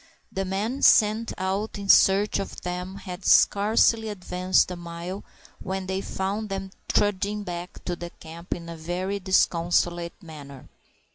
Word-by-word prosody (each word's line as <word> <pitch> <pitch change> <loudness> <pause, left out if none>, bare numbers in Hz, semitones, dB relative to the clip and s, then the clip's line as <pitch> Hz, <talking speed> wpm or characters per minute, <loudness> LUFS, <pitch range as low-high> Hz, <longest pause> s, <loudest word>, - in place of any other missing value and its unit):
The 195 0 -2
men 210 +8 -2
sent 220 +1 +4
out 195 +4 -2
in 200 -1 -6
search 195 +2 +5
of 195 - -6
them 180 +1 -4
had 185 -1 -8
scarcely 220 +3 +4
advanced 185 -2 +1
a - - -4
mile 175 +2 -7 0.4
when 190 0 -4
they 190 +1 -2
found 200 +3 -3
them 195 0 -4 0.2
trudging 205 +1 0
back 175 -1 -7
to 175 - -2
the 175 0 -7
camp 170 +1 -7
in 170 -1 -9
a 170 - -6
very 180 +5 -3
disconsolate 175 -2 +1
manner. 140 -5 -11
190 Hz, 145 wpm, -25 LUFS, 175-200 Hz, 0.4 s, search